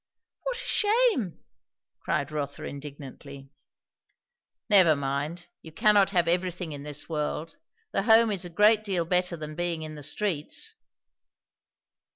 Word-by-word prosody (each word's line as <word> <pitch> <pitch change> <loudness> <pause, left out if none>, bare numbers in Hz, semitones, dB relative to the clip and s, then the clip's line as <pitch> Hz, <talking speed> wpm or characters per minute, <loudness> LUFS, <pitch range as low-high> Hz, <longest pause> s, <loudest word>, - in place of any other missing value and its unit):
"What - - -2
a - - -2
shame!" 420 - +1 0.6
cried 140 +1 -2
Rotha 145 -2 -4
indignantly. 140 -1 -9 1.2
"Never 185 -7 +6
mind; 140 +5 -3 0.2
you 160 - -11
cannot 205 +1 +4
have 175 -4 +2
everything 180 -1 -1
in 145 -1 -6
this 145 0 -6
world; 155 +1 -3 0.3
the - - +1
Home 225 +1 +5
is 195 -3 -1
a 175 - -7
great 210 +5 +4
deal 185 -5 -1
better 180 0 0
than 155 -1 -6
being 170 -1 -2
in 155 0 -6
the 150 - -9
streets." 155 +1 -2
170 Hz, 135 wpm, -27 LUFS, 150-200 Hz, 1.2 s, Never